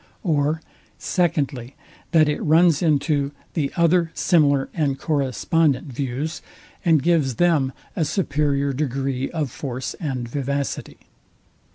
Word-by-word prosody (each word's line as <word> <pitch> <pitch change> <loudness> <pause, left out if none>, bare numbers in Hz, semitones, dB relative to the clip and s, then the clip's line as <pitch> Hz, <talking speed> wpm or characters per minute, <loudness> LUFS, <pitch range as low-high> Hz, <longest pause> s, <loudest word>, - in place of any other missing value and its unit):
Or, 155 -2 +1 0.3
SECONDLY, 140 -8 -1 0.3
That 160 -3 +4
it 150 - -1
runs 165 0 +4
into 145 -3 +1 0.2
the 145 -4 -1
other 170 0 +3
similar 145 -6 +3
and 145 -5 0
correspondent 145 -1 0
views, 140 +5 -3 0.4
and 160 -5 +3
gives 155 -7 +2
them 155 -5 +2 0.2
a 165 - +1
superior 140 -5 0
degree 135 -1 -2
of 155 -6 -3
force 130 -2 -5
and 130 -7 -3
vivacity. 140 +2 -3
145 Hz, 110 wpm, -22 LUFS, 135-160 Hz, 0.4 s, That